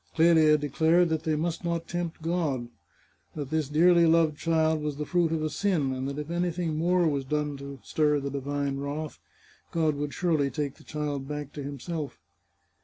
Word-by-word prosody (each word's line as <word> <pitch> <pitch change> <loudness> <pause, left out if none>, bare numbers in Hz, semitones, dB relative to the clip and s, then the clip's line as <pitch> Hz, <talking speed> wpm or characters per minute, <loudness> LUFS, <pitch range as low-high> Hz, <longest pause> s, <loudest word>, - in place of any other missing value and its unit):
Clelia 160 -2 +6
declared 160 +4 +3
that 160 -1 -1
they 160 -1 +1
must 165 +3 -2
not 170 -1 -2
tempt 170 -2 -4
God; 155 -8 -1 0.7
that 145 -2 -5
this 155 -3 0
dearly 170 +2 +5
loved 160 -2 +4
child 160 0 +1
was 150 -1 -2
the 150 - -3
fruit 175 -1 +1
of 160 -1 0
a 155 - 0
sin, 155 -6 0
and 130 +1 -3
that 140 - -5
if 150 +2 -5
anything 175 -2 -1
more 175 +2 +2
was 140 -3 0
done 150 +1 -1
to 140 0 -8
stir 150 -1 +2
the 140 0 -4
divine 140 0 -2
wrath, 145 +2 -4 0.5
God 160 -2 +2
would 145 0 -4
surely 160 -6 +1
take 145 -2 -3
the - - -17
child 145 -3 -3
back 150 -1 -5
to 145 - -6
himself. 145 +2 -5
155 Hz, 185 wpm, -28 LUFS, 145-165 Hz, 0.7 s, Clelia